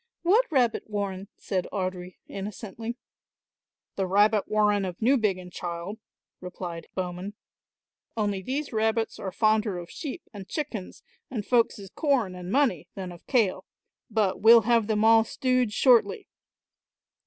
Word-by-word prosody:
"What 415 +5 +3
rabbit 245 -6 +1
warren?" 200 -2 -3
said 185 -2 -2
Audry 185 -2 -4
innocently. 215 +4 -6 1.0
"The 190 -1 0
rabbit 205 +2 +3
warren 210 -1 +2
of 180 -2 -4
Newbiggin, 215 -7 +1
child," 175 +5 -5 0.4
replied 175 -2 -7
Bowman; 185 +2 -4 0.8
"only 205 -3 0
these 275 +6 -3
rabbits 220 +1 0
are 190 - -4
fonder 215 -2 +2
of 175 0 -8
sheep 310 +2 -6
and 200 -1 -9
chickens 255 - -5 0.3
and 220 -6 -4
folks' 235 -3 +2
corn 265 -11 +1
and 180 0 -7
money 220 - +2
than 185 -2 -5
of 175 - -14
kail, 225 -8 +1 0.4
but 210 -4 0
we'll 230 +1 +8
have 230 -1 +2
them 215 0 +1
all 225 0 +7
stewed 255 -1 0
shortly." 230 -3 +3
210 Hz, 130 wpm, -27 LUFS, 185-230 Hz, 1.0 s, we'll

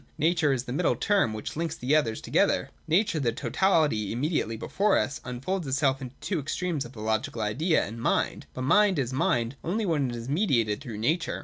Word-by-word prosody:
Nature 160 -1 +2
is 130 -2 0
the 125 - -5
middle 175 +6 +1
term 200 - +2
which 110 0 -5
finks 165 0 -3
the 135 +2 +1
others 115 -8 +1
together. - - +1 0.2
Nature, 170 +1 +2
the 120 -5 +1
totality 150 - +1
im 115 - -3
mediately 145 -7 0
before 200 - +1
us, 140 - -1
unfolds 140 +8 -3
itself 135 0 +1
into 130 0 -8
the - - -14
two 185 -5 0
extremes 155 +1 -2
of 120 - -11
the 110 - -11
Logical 110 +5 -1
Idea 155 - +1
and 115 +3 -7
Mind. - - 0
But 130 - -3
Mind 200 +6 +4
is 130 -2 -1
Mind 120 -1 0
only 210 +6 -1
when 150 -7 +1
it 120 - -4
is 115 0 -6
mediated 130 - +1
through 115 -4 -7
nature. 155 +10 0
140 Hz, 210 wpm, -27 LUFS, 120-170 Hz, 0.2 s, Mind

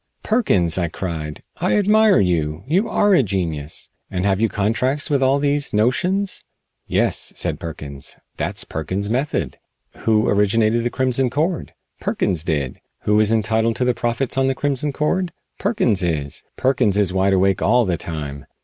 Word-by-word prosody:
"Perkins!" 95 - +2
I 85 - +1
cried, 80 -3 -5
"I - - +1
admire 210 0 +5
you. 85 -3 0
You 185 - +1
are 205 -1 +3
a 175 - +6
genius. 85 - -3 0.2
And 90 +1 -2
have 100 0 +1
you 115 - +3
contracts 125 +9 0
with 140 -2 +2
all 135 +1 +4
these 145 -1 0
notions?" 180 - +1 0.4
"Yes," - - +1
said - - -1
Perkins, 70 -4 -7 0.2
"that's - - -1
Perkins' 95 +7 -3
method. 125 - -1 0.4
Who 110 -1 +2
originated 110 +3 +2
the 120 - 0
Crimson 130 0 +1
Cord? 160 +7 -2 0.2
Perkins 85 -4 -1
did. 75 -7 -2 0.2
Who 105 0 +2
is 110 0 +3
entitled 110 +1 +1
to 125 - 0
the 125 - +3
profits 120 +3 -1
on 135 - +2
the 135 - +1
Crimson 145 +1 -1
Cord? 170 +5 -1 0.3
Perkins 155 - +1
is. 75 -5 -2 0.2
Perkins 125 -6 +2
is 100 -3 +1
wide 95 +1 +2
awake 95 0 +2
all 120 +3 +4
the 90 -3 0
time. 75 -4 -6
110 Hz, 160 wpm, -21 LUFS, 90-135 Hz, 0.4 s, a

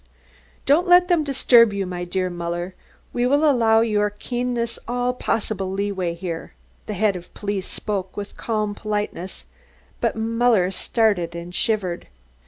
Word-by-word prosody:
"Don't 310 +7 +4
let 355 +1 +6
them 345 -3 +3
disturb 245 -5 +5
you, 200 -1 -1
my 180 -1 -4
dear 185 0 -1
Muller; 175 +1 -4 0.4
we 245 0 +1
will 290 +4 +3
allow 225 -5 +4
your 210 -2 +2
keenness 240 +2 -3
all 245 +1 0
possible 215 -5 -2
leeway 190 -3 -2
here." 170 -2 -6 0.3
The 210 - -3
Head 205 0 +2
of 180 -1 -9
Police 200 -2 -3
spoke 195 -3 -4
with 205 0 -6
calm 215 -2 -2
politeness, 205 -3 -4 0.5
but - - 0
Muller 225 -4 +2
started 195 -5 +1
and 170 +1 -7
shivered. 190 -4 -1
210 Hz, 145 wpm, -22 LUFS, 185-235 Hz, 0.5 s, let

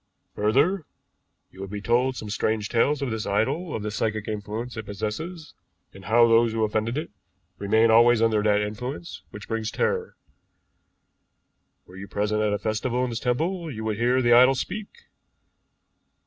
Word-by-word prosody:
Further, 145 - +2 0.7
you 95 - -12
would 95 - -6
be 105 +1 -5
told 125 +4 +1
some 105 -4 -6
strange 110 0 -1
tales 140 +5 +1
of 130 - -2
this 110 -1 -3
idol, 135 - -1
of 110 - -4
the 105 - -3
psychic 110 0 -2
influence 110 +3 -5
it 110 -2 -7
possesses, 150 - -5 0.4
and 95 -1 -13
how 120 +1 +5
those 115 0 +4
who 110 -1 0
offend 110 +1 0
it 155 - -4 0.5
remain 110 +3 +3
always 120 +1 +6
under 110 -2 +2
that 105 -1 +2
influence 125 +10 -5
which 105 +1 -10
brings 110 -1 -2
terror. - - -1 1.7
Were 90 - -14
you 100 +1 -8
present 105 +1 -1
at 105 -1 +1
a 105 - 0
festival 110 +4 -1
in 125 - -2
this 115 - -3
temple, 165 +8 -1
you 110 -6 -6
would 110 -2 -2
hear 125 +3 +2
the 120 0 +5
idol 130 +3 +7
speak. 205 +10 -4
110 Hz, 170 wpm, -25 LUFS, 105-125 Hz, 1.7 s, idol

